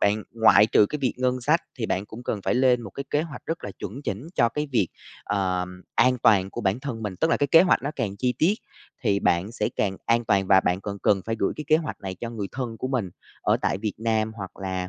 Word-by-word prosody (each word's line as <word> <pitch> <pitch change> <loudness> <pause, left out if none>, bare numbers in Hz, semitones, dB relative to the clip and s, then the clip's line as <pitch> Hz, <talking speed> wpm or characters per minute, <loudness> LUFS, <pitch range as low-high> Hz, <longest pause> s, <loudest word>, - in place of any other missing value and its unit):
bạn 105 +1 +2
ngoại 110 -2 +6
trừ 105 - +4
cái 150 - -4
việc 130 -3 0
ngân 125 0 0
sách 150 +7 +3 0.2
thì 115 - -1
bạn 95 0 -1
cũng 115 +3 -10
cần 110 -4 -3
phải - - +1
lên 125 -1 +3
một 100 - -8
cái 140 - -6
kế 150 - +2
hoạch 160 -3 -9
rất 165 +1 -4
là 105 - -4
chuẩn 120 +9 -6
chỉnh 105 +3 -4
cho 120 - +4
cái 150 +6 -3
việc, 100 -8 +2 0.4
ờm, 90 -2 -2
an 125 +1 +4
toàn 95 -2 +4
của - - -5
bản 100 +4 0
thân 130 -5 -5
mình. 105 -3 -3
Tức 160 - +1
là - - +4
cái 145 - +1
kế 165 +5 +7
hoạch 180 - +3
nó 140 - -2
càng 105 -6 -2
chi 125 +4 0
tiết 175 +6 +4 0.5
thì 100 0 +2
bạn 90 +6 +1
sẽ 105 -3 -1
càng 95 -2 0
an 115 0 +2
toàn 100 -3 +2
và 95 - +6
bạn 90 0 0
cần 100 0 -5
cần 100 -2 +3
phải 115 0 -1
gửi 100 - +1
cái 150 - -5
kế 155 0 +5
hoạch 160 -1 -5
này 95 -1 -5
cho 115 +5 -6
người 110 -4 -4
thân 125 -4 -4
của 130 - -4
mình 120 -9 -1 0.3
ở - - +2
tại - - 0
Việt 105 0 -2
Nam 110 -1 0
hoặc 95 -3 -8
là, 95 -1 -3
110 Hz, 270 wpm, -25 LUFS, 100-130 Hz, 0.5 s, kế